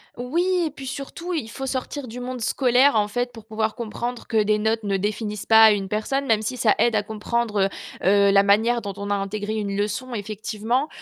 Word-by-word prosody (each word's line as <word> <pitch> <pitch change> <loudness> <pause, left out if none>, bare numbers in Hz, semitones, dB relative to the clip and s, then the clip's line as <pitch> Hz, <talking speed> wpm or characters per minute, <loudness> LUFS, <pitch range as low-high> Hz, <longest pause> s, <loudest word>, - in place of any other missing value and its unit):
Oui 265 +9 -1 0.2
et 310 - -3
puis, 270 -1 -9
surtout, 280 +7 -5
il 295 -10 -3
faut 270 +3 -6
sortir 265 +1 -4
du 240 +2 -7
monde 250 0 -5
scolaire, 250 +3 +3
en 210 -1 +3
fait, 245 +4 -2
pour 225 -3 -13
pouvoir 220 0 -2
comprendre 235 +1 -5
que 220 -2 +2
des 210 0 +2
notes 220 +1 0
ne 200 -1 0
définissent 210 +1 -3
pas 220 0 +8
une 195 -2 -1
personne, 270 +7 -1
même 225 -4 +2
si 250 +4 -3
ça 220 -3 +4
aide 235 -2 +3
à 210 - +2
comprendre, 215 0 -1 0.4
heu, - - -5
heu, 200 0 +5
la 195 0 +6
manière 220 +4 +3
dont 200 -2 -5
on 200 0 -5
a - - +3
intégré 205 +2 -3
une 205 -2 -2
leçon, 210 +5 -2
effectivement. 220 +5 -2
220 Hz, 220 wpm, -23 LUFS, 210-245 Hz, 0.4 s, pas